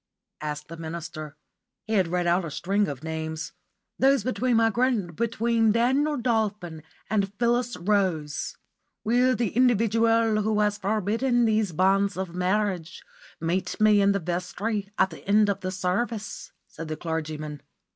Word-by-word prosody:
asked 150 0 -4
the 165 - -9
minister. 160 -2 -7 0.5
He 220 - -3
had 190 -5 +3
read 175 +1 -1
out 175 +2 +2
a 165 - -4
string 195 +7 0
of 140 0 -6
names. 160 -1 -4 0.5
"Those 270 -3 +4
between 255 -1 0
my 225 0 +4
grand 225 -7 0
between 230 0 +1
Daniel 265 +7 +2
Dolphin 210 -9 -1 0.3
and 200 -2 0
Phyllis 240 +2 0
Rose." 175 -6 -1 0.5
"Will 250 +3 +3
the 235 -4 0
individual 230 -2 +3
who 215 0 +1
has 210 0 +1
forbidden 220 +5 +1
these 215 -3 +1
banns 195 +3 +2
of 185 -2 -4
marriage 180 -2 -1 0.4
meet 170 +3 -2
me 215 -1 +5
in 200 0 +4
the 200 - +1
vestry 195 +4 -3
at 190 -1 +3
the 160 - -11
end 210 +1 +4
of 200 - -1
the 185 - -4
service?" 200 +4 -3
said 165 0 -9
the 155 0 -4
clergyman. 155 -2 -4
200 Hz, 150 wpm, -26 LUFS, 170-225 Hz, 0.5 s, me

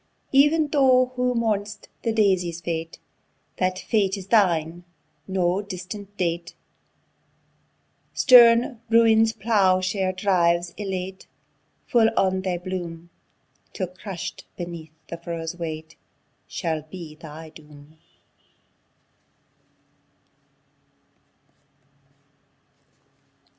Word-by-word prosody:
Ev'n 295 +3 +4
thou 255 -3 +4
who 250 0 0
mourn'st 210 -2 -2
the 230 - 0
Daisy's 185 -6 +1
fate, 165 -1 -4 0.6
That 185 0 0
fate 200 -1 0
is 190 - -8
thine 175 -5 +2 0.4
no 185 0 0
distant 200 +1 -8
date; 170 -1 -2 1.6
Stern 240 -1 +6
Ruin's 225 -1 +5
plough 205 -4 +2
share 190 0 -1
drives 175 -3 +1
elate, 190 -2 -5 0.6
Full 225 -2 +4
on 190 0 +2
thy 185 -2 -2
bloom, 175 -2 -6 0.6
Till 185 - -2
crush'd 185 -1 -7
beneath 170 -3 -7
the 170 - -5
furrow's 165 -1 -5
weight, 160 -2 -6 0.5
Shall 160 -3 -3
be 155 0 -10
thy 155 +1 -11
doom! 150 0 -16
185 Hz, 85 wpm, -24 LUFS, 170-215 Hz, 1.6 s, Stern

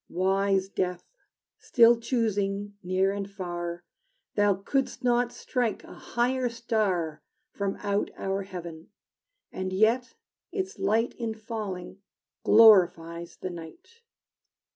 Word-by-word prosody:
Wise 195 +1 +1
Death, 180 -2 -2 0.6
still 235 0 +5
choosing 205 -4 -1
near 185 +1 +1
and 200 0 -4
far, 175 -3 -5 0.5
Thou 205 -1 +3
couldst 260 +10 -2
not 245 0 +2
strike 245 -1 -2
a - - -12
higher 250 +1 -1
star 215 -9 -1 0.3
From 200 -1 -2
out 205 0 0
our 195 0 -2
heaven, 170 -4 -8 0.6
and 185 0 -4
yet 225 +6 +2 0.4
its 385 +1 -4
light 225 +3 +1
In 225 -2 -2
falling 210 -4 -6 0.4
glorifies 175 -6 +5
the 185 - -5
night! 175 - -12
200 Hz, 110 wpm, -27 LUFS, 185-230 Hz, 0.6 s, still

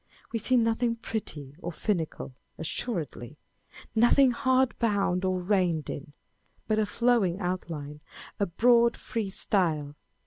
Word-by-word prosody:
We 230 - 0
see 255 +4 +2
nothing 230 0 +2
petty 155 -12 -5
or 175 - -5
finical, 165 -7 -3 0.2
assuredly, 160 - -4 0.4
â€" - - -19
nothing 240 +3 +5
hard 260 0 +2
bound 200 -5 +1
or 185 -1 +1
reined 180 -4 +1
in, 145 - -6
â€" 145 - -21 0.5
but 215 0 +2
a 215 - +1
flowing 230 -7 +2
outline, 160 -5 -4 0.4
a 200 - +1
broad 235 +5 +4
free 220 -4 -3
style. 160 -8 0
200 Hz, 135 wpm, -28 LUFS, 165-230 Hz, 0.5 s, nothing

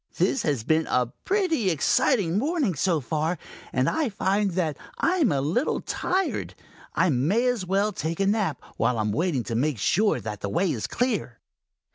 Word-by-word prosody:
"This 270 - +2
has 140 -7 -1
been 160 +5 +2
a 125 -1 0
pretty 360 - +1
exciting 180 - +2
morning 285 - 0
so 165 +1 +1
far, 155 +6 -1 0.3
and 130 +1 +1
I 315 -5 +1
find 200 0 +1
that 165 -5 0 0.2
I 365 +2 +1
am 295 - +3
a 140 -2 +1
little 170 - 0
tired. 375 +1 -2 0.4
I 185 - +3
may 165 - +2
as 245 -7 0
well 200 +3 +2
take 165 -3 -3
a 195 - +2
nap 200 - +1 0.2
while 125 - +1
I - - +1
am 105 -1 0
waiting 145 - 0
to 115 - -5
make 140 +2 +1
sure 205 - +2
that 105 -2 -6
the 100 - -3
way 175 - +1
is 110 - -3
clear." 225 - -2
180 Hz, 185 wpm, -25 LUFS, 140-220 Hz, 0.4 s, am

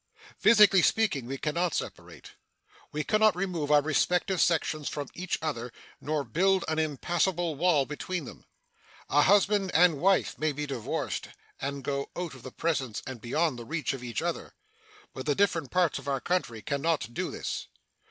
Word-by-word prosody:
Physically 210 -4 +6
speaking, 185 - +1
we 135 +2 -4
can 150 +2 -2
not 170 -1 0
separate. - - -6 0.6
We 150 +1 -2
can 215 +5 +1
not 215 -3 +5
remove 180 -5 -2
our 150 -1 +5
respective 180 +5 +1
sections 155 -3 +1
from 145 -2 -5
each 180 0 -3
other 125 -6 -3 0.3
nor 150 0 -1
build 185 - +2
an 160 0 0
impassable 170 +3 0
wall 155 -2 +2
between 175 +5 -4
them. - - -11 0.7
A - - +5
husband 200 -1 +3
and 165 -4 +5
wife 195 +2 +2
may 155 -1 +1
be 150 +1 -3
divorced 130 -6 -3 0.3
and 140 0 -4
go 140 +1 -2
out 175 -3 -4
of 130 - -12
the 130 - -8
presence 135 -10 -2
and 130 -4 -7
beyond 145 +2 0
the - - -7
reach 155 +1 -2
of 130 -2 -7
each 120 +5 -3
other, 170 -1 -4 0.6
but - - -7
the 145 - +2
different 165 -8 +1
parts 180 -3 +1
of - - -12
our 135 -1 0
country 130 -10 -2
can 140 -1 -2
not 155 -9 0
do - - -2
this. - - -5
155 Hz, 180 wpm, -28 LUFS, 140-180 Hz, 0.7 s, Physically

